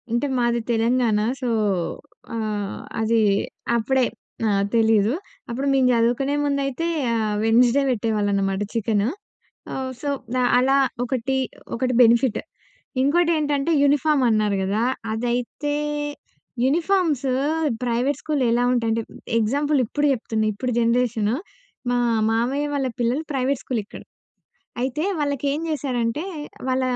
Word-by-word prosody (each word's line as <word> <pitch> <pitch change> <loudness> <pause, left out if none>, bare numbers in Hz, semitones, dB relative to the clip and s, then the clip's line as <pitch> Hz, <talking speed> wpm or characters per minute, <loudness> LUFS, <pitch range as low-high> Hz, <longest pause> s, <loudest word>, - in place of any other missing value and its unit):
అంటే 240 +5 0
మాది 240 -1 +1
తెలంగాణ. 230 -1 +2 0.2
సో 250 - -1 0.9
ఆహ్, 210 -3 -3 0.2
అది 225 +1 +2 0.6
అప్పుడే 260 +3 +2 0.4
ఆహ్, 200 -1 +2
తెలీదు. 220 0 +3 0.4
అప్పుడు 265 +4 -2
మేము 265 -2 +4
జదువుకునే 240 +5 +1
ముందైతే 280 +2 -1 0.3
ఆహ్, 215 -2 0
వెడ్న‌‌స్డే 240 +4 +4
వెట్టేవాళ్ళనమాట 205 -4 0
చికెన్. 220 -3 +1 0.7
ఆహ్, 260 -1 -3
సో 290 - -2 0.3
ఆహ్, 245 - +3
అలా 270 +2 +3 0.3
ఒకటి 260 +1 -1 0.4
ఒకటి 255 +1 0
బెనిఫిట్. 235 0 +3 0.6
ఇంకోటేంటంటే 305 0 +2
యూనిఫార్మ్ 290 0 +3
అన్నారు 215 -2 +2
గదా! 200 +3 0 0.3
అదైతే 245 +6 -2 0.9
యూనిఫార్మ్స్ 320 -2 +1 0.6
ప్రైవేట్ 245 +4 0
స్కూల్ 300 -3 -1
ఎలా 240 +1 +2
ఉంటాయంటే, 230 -2 +1 0.4
ఎగ్జాంపుల్ 285 +7 +1
ఇప్పుడు 290 +6 -1
జేప్తున్నా 220 -3 -1
ఇప్పుడు 250 +5 -3
జనరేషన్. 230 -2 +1 0.6
మా 245 - +2 0.3
మామయ్య 250 +6 0
వాళ్ళ 275 -2 0
పిల్లలు 245 +6 0
ప్రైవేట్ 265 -1 0
స్కూల్ 240 -4 -2
ఇక్కడ. - - -11 0.8
అయితే 265 +4 -1 0.2
వాళ్ళకి 285 -1 -1
ఏం 300 - -3
చేశారంటే 255 -1 -1 0.4
వాళ్ళ 260 0 +1
245 Hz, 115 wpm, -23 LUFS, 225-275 Hz, 0.9 s, మేము